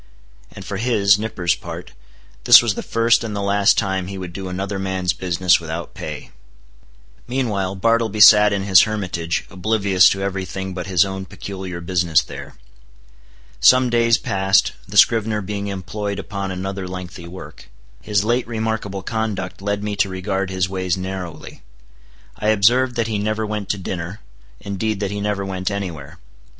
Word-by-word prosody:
And 95 - -10
for 100 - -4
his 105 -3 +3
(Nippers') 95 -6 0
part, 85 -3 -8 0.5
this - - +10
was 120 -3 0
the - - -5
first 115 0 +2
and 110 -2 -4
the - - -2
last 100 0 +3
time 95 -1 -1
he 100 0 -6
would 90 -2 -7
do 95 +1 -6
another 95 +2 -4
man's 95 -2 -1
business 90 0 +2
without 85 0 -6
pay. - - -7 1.0
Meanwhile 105 -7 -1
Bartleby 115 +1 +1
sat 105 0 +8
in 100 -1 -1
his 95 -2 +6
hermitage, 90 -6 -2
oblivious 100 -1 +3
to 95 0 -2
every 95 -1 -2
thing 95 +1 -5
but 90 0 -5
his 90 -1 +3
own 95 0 -5
peculiar 95 -1 -7
business 85 -2 +2
there. - - -10 1.0
Some 130 -1 +5
days 115 -1 +4
passed, 95 0 +2 0.2
the - - -4
scrivener 110 -1 +4
being 100 0 -4
employed 100 +1 -4
upon 100 -1 -5
another 95 +1 -4
lengthy 90 -1 -8
work. 95 +2 -11 0.3
His 105 -2 0
late 120 +3 0
remarkable 110 -4 -3
conduct 105 -4 -3
led 100 0 -2
me 105 -1 -2
to 100 0 +2
regard 95 +1 -2
his 95 -1 -1
ways 95 -1 -2
narrowly. 95 -2 -7 0.8
I 105 - -3
observed 120 +4 +3
that 115 -2 0
he 110 -2 -2
never 110 +1 -1
went 105 -2 -4
to 105 - 0
dinner; 90 +1 -5 0.4
indeed 100 +1 -3
that 100 -1 -2
he 100 0 -4
never 100 -1 -2
went 95 -1 -3
any 100 -3 -3
where. 70 -4 -11
100 Hz, 165 wpm, -20 LUFS, 95-105 Hz, 1.0 s, this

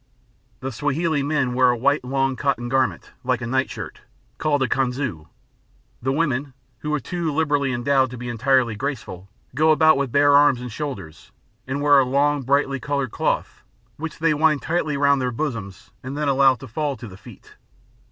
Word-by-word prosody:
The 135 - -4
Swahili 145 +4 0
men 140 -3 0
wear 125 0 +4
a 120 - +1
long - - -11 0.5
white 130 - -7
cotton 120 -4 -1
garment, 130 0 0
like 125 -2 0
a 120 - -5
night 130 +2 0
shirt, - - -8 0.4
called 145 -3 +1
a - - +1
kanzu; 125 - -2 0.7
the 130 +3 0
women 140 -3 -1 0.2
who 150 - -4
are - - -1
too 170 +3 -3
liberally 145 -3 +1
endowed 130 +2 +2
to 125 - -8
be 125 +1 -7
entirely 120 0 +1
graceful 105 -8 -5 0.2
go 155 +1 +3
about 155 -1 +5
with 135 -3 -1
bare 145 +1 +5
arms 145 -3 +5
and 125 -1 -7
shoulders, 100 - -7 0.4
and 140 +2 -2
wear 145 -1 +6
a - - +4
long 140 +3 +1
brightly 140 +1 +1
coloured 140 -1 -2
cloth - - -2 0.4
which 160 +1 -6
they 160 -1 +2
wind 150 -1 +2
tightly 160 -3 -1
round 140 -1 +3
their 125 - 0
bosoms 115 -8 -5
and 130 +3 -6
then 150 -1 -1
allow 135 -1 +4
to 130 - -11
fall 145 +3 -2
to 120 +1 -9
the 95 - -11
feet. - - -15
135 Hz, 185 wpm, -22 LUFS, 125-145 Hz, 0.7 s, wear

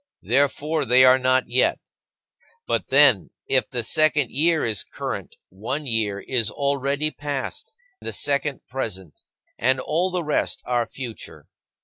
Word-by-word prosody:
Therefore, 145 +3 +1
they 130 +1 +5
are 130 +1 +6
not 130 0 +2
yet. 125 +2 +2 0.9
But, - - -1
then, 130 - +4 0.2
if 130 - +1
the 120 -2 -3
second 150 0 +2
year 160 +2 +2
is 110 -4 0
current, - - -6
one 115 +11 -5
year 110 -5 -1
is 120 -1 0
already 140 +2 -1
past, 145 - -5 0.2
the - - -4
second 140 -1 0
present, 95 - -5 0.4
and 130 0 +2
all 175 +7 0
the 180 -1 -2
rest 150 -1 -1
are 120 -1 0
future. 125 -4 -9
130 Hz, 135 wpm, -23 LUFS, 120-145 Hz, 0.9 s, are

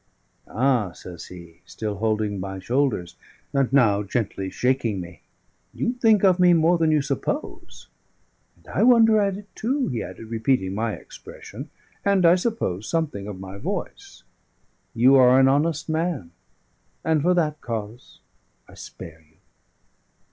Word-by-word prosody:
"Ah!" 120 -6 0
says 90 -1 -10
he, 85 -2 -13
still 105 -2 -5
holding 105 -1 -1
my 95 +1 -5
shoulders, 100 -5 -1 0.4
and 135 -3 +1
now 115 -7 +4
gently 100 -2 -3
shaking 125 -3 0
me, 85 -2 -10 0.5
"you 240 - -1
think 225 -5 +3
of 185 -2 +4
me 180 -1 +6
more 165 +1 +3
than 160 -1 +2
you 155 -2 +2
suppose. 145 - -5 0.7
'And - - -26
I - - -1
wonder 225 -2 +6
at 195 -1 0
it 205 0 -12
too,'" 260 +4 -1
he 120 -3 -3
added, 115 - -8
repeating 110 -4 0
my 110 +1 -2
expression - - -11 0.3
and, 200 -3 +3
I 170 - +7
suppose, 180 - -2
something 150 -12 -2
of 100 -3 -7
my 95 +1 -9
voice. - - -6 0.7
"You 125 +4 +5
are 130 0 +6
an 135 - +5
honest 150 +3 +1
man, 160 - -2 0.7
and 160 -2 +2
for 180 +4 +2
that 155 -3 0
cause 115 +1 -7 0.5
I - - -17
spare 80 -1 -11
you." 80 - -32
130 Hz, 150 wpm, -23 LUFS, 100-170 Hz, 0.7 s, I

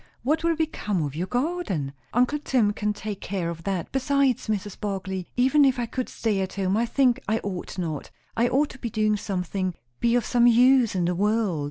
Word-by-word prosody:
What 310 +6 +1
will 335 0 +2
become 210 - -1
of 145 -1 -4
your 175 +4 -2
garden?" 245 - -2 0.2
"Uncle 250 +5 +2
Tim 240 -8 +1
can 210 0 -1
take 210 -1 -6
care 180 -4 -2
of 165 0 -9
that. 190 -4 -2
Besides, 270 -2 +1
Mrs. 205 -2 -3
Barclay, 190 -3 -3
even 265 +4 +5
if 265 -2 +3
I 240 - -1
could 255 +2 -4
stay 215 -4 -1
at 190 - -3
home, 195 0 0
I 235 +2 +1
think 255 0 +3
I 220 - +2
ought 190 -2 -5
not. 160 -5 -3 0.3
I 235 +1 +3
ought 275 +4 +2
to 265 - -13
be 235 - -3
doing 215 -1 +1
something 185 -2 -2 0.2
be 235 0 +2
of 240 -3 +1
some 240 0 +4
use 245 -1 +5
in 180 -2 +1
the 175 - +1
world. 205 -2 +1
215 Hz, 210 wpm, -25 LUFS, 190-255 Hz, 0.3 s, even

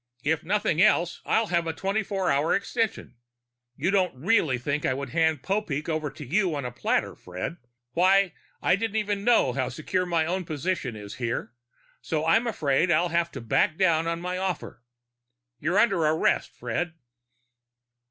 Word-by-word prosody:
"If 155 +1 0
nothing 180 -3 +1
else, 180 -4 +3
I'll 225 - +3
have 170 -1 +2
a 165 - -1
twenty 195 +5 -1
four 185 -7 +1
extension. 215 - -2 0.6
You 165 +9 0
didn't 180 -9 +1
really 165 - +2
think 145 +4 -2
I 130 - +1
could 140 0 -5
hand 160 -3 +1
Popeek 190 -8 -2
over 155 -2 -1
to 150 - -10
you 180 +4 +1
on 140 -3 -3
a 125 - -3
platter, 120 - 0
Fred? 90 - -6 0.3
Why, 185 +3 +4 0.3
I 180 - +4
don't 220 0 -3
even 205 -2 -1
know 225 - +4
how 130 -1 -1
secure 180 +3 -2
my 165 -2 +1
own 185 +3 -1
position 155 -5 -3
is 105 -1 -8
here. 120 -2 -3 0.5
So 155 -1 -2
I'm 225 +9 +3
afraid 160 -5 +1
I'll 170 +1 +3
have 170 0 0
to - - -6
back 115 +7 +1
down 165 -4 +3
on 165 0 -2
my 180 +1 -3
offer. 185 -8 -4 0.8
You're 175 +5 0
under 200 -6 +3
arrest, 155 +1 +2
Fred!" 165 +9 -3
170 Hz, 170 wpm, -26 LUFS, 145-190 Hz, 0.8 s, Why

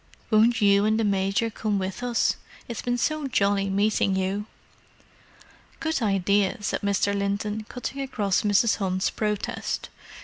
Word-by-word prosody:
"Won't 225 +1 +4
you 200 0 +5
and 215 +1 +2
the - - +2
Major 200 +2 +1
come 210 -1 -1
with 190 +3 -3
us? 245 -2 +1 0.3
It's 235 - -5
been 245 0 -1
so 310 +3 -1
jolly 200 -4 +1
meeting 200 0 +1
you." 190 +3 -1 1.3
"Good 320 -4 -1
idea!" 200 0 +2
said - - -1
Mr. 200 0 +1
Linton, 205 +2 -2
cutting 265 +2 -5
across 210 -8 0
Mrs. 210 +2 +3
Hunt's 185 -2 0
protest. 210 -2 -3
205 Hz, 140 wpm, -25 LUFS, 200-225 Hz, 1.3 s, you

